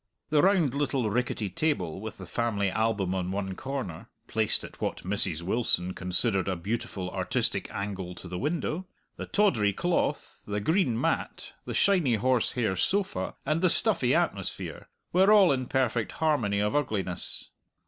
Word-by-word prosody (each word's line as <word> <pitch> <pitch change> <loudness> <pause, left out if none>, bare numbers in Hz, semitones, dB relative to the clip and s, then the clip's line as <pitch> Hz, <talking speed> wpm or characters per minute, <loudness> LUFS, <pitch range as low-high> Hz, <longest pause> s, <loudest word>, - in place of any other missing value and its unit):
The 150 -1 +5
round 180 -8 +3
little 140 -6 0
rickety 120 -2 -1
table 95 - -1
with 110 -1 -6
the 95 - -8
family 100 0 0
album 110 -4 0
on 90 -1 -2
one 95 0 -2
corner 130 -8 -5 0.2
(placed 110 -1 0
at - - -11
what - - -2
Mrs. 95 -4 0
Wilson 95 -3 +1
considered 95 +2 +1
a 95 - 0
beautiful 95 0 -4
artistic - - -1
angle 95 -3 -4
to 90 - -9
the 90 0 -5
window), 165 +4 -2 0.3
the - - -5
tawdry 115 - +2
cloth, 175 - -1
the 105 0 -1
green 140 - +1
mat, - - -2
the - - -4
shiny 175 - +3
horsehair 120 -2 +1
sofa, 185 - 0
and 155 +3 +1
the 185 - +4
stuffy - - +3
atmosphere, - - -2 0.2
were 190 +3 +5
all 200 -5 +7
in 130 -2 -1
perfect 125 -4 0
harmony 135 -11 +1
of 105 +5 0
ugliness. 105 -11 -2
110 Hz, 155 wpm, -28 LUFS, 95-145 Hz, 0.3 s, all